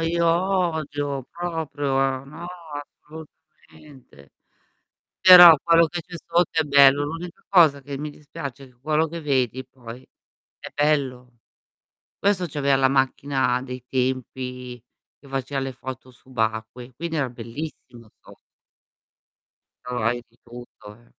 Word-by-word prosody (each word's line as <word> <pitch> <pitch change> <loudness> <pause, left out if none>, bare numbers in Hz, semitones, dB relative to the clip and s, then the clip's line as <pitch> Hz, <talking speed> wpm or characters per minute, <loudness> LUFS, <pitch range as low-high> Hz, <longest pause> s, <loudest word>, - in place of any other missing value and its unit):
io 170 +1 0
odio 160 -7 -1
proprio, 145 -6 -2
no, 160 +5 -10 0.3
assolutamente. 135 - -16 0.9
Però, 175 -3 +10
quello 170 0 +5
che 175 +1 -6
c'è 180 +1 -13
sotto 170 0 +1
è - - +3
bello. 140 0 +5
L' 145 - -3
unica 165 +2 -8
cosa 160 -7 +5
che 140 0 -7
mi 150 +2 -5
dispiace 140 -2 -9
quello 155 +2 +1
che 170 +1 -7
vedi 130 -3 0
poi 125 -1 -12 0.5
è - - -9
bello. 130 -5 -1 0.8
Questo 195 -3 +1
c'aveva 140 -1 +2
la 135 0 +4
macchina 135 -1 0
dei 125 -1 -8
tempi 125 -1 -3 0.4
che 140 - -18
faceva 135 +1 -3
le 135 0 -4
foto 130 0 -9
subacquee, 120 0 -4
quindi 165 +3 -4
era 135 -4 0
bellissimo 120 -1 -9
so - - -16 1.5
Trovavi 120 -1 -2
di 120 +1 -32
tutto, 120 -3 -13
eh. 120 0 -24
135 Hz, 120 wpm, -23 LUFS, 125-155 Hz, 1.5 s, Però